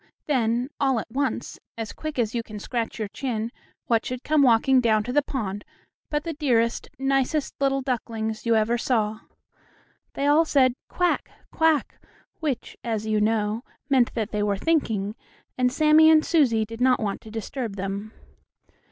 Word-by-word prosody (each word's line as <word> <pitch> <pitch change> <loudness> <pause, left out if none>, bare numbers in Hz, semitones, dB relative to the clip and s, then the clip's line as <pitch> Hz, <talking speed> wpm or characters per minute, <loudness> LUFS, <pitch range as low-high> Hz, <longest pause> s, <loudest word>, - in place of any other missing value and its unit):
Then 245 -1 0
all 265 -4 +2
at 225 - -8
once, 275 +2 -2 0.2
as 225 -2 -5
quick 310 -2 -6
as 230 -3 0
you 235 - 0
can 215 -2 -9
scratch 230 +2 -3
your 215 -2 -2
chin, 230 -1 -3 0.3
what 230 -2 +2
should 250 0 -5
come 310 -1 +3
walking 255 +1 +5
down 220 -3 +3
to 245 +3 -4
the 290 - +4
pond 205 -8 -4 0.5
but 295 0 -1
the 330 - -3
dearest, 240 -6 +1
nicest 270 +2 0
little 275 -1 +1
ducklings 225 -4 -3
you 230 -1 +2
ever 225 +2 +2
saw. 220 -3 0 1.0
They 280 - -1
all 295 +3 +5
said, 265 -5 +3 0.2
"Quack! 355 -1 0 0.2
quack!" 320 -3 +1 0.4
which, 280 -6 -3
as 220 -2 -2
you 215 -1 +1
knew, 215 0 +1 0.3
meant 255 -3 +3
that 220 -3 -2
they 210 - -1
were 205 -1 +1
thinking, 220 -8 0 0.4
and 250 -1 +2
Sammie 310 +2 +6
and 310 -1 +5
Susie 245 -10 +3
did 225 +2 -9
not 255 0 +4
want 205 -3 -2
to 220 - -12
disturb 225 0 -5
them. 200 +2 -4
240 Hz, 170 wpm, -25 LUFS, 220-275 Hz, 1.0 s, Sammie